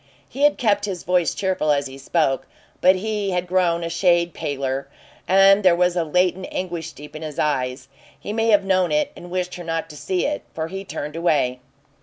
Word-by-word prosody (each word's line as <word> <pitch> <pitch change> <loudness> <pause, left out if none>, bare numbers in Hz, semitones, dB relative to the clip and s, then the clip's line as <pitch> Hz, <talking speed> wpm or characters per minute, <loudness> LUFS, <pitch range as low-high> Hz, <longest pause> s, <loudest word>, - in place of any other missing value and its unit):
He 275 - -8
had 295 - +3
kept 205 -4 +1
his 190 -4 -5
voice 180 -1 +1
cheerful 185 -6 0
as 140 -1 +1
he 135 0 -9
spoke, 135 -1 0 0.3
but 185 +1 +6
he 210 +1 -2
had 180 -1 -1
grown 175 -2 +1
a 165 - -2
shade 170 -1 +2
paler, 135 -1 -3 0.4
and 195 +2 +6
there 185 -3 +5
was 180 0 +2
a 175 - +1
latent 180 +3 +1
anguish 170 -3 -4
deep 150 +1 -12
in 155 - -7
his 155 -2 -6
eyes. 130 -3 -1 0.3
He 205 - -5
may 225 +1 0
have 205 -3 +5
known 185 -2 +2
it 300 -1 +1
and 175 - -11
wished 180 0 -2
her 175 - -7
not 165 -1 -3
to - - -11
see 180 +4 -1
it, 295 0 -1
for 160 0 -3
he 195 +2 -5
turned 150 -5 -6
away. 145 -7 +1
175 Hz, 210 wpm, -22 LUFS, 155-190 Hz, 0.4 s, but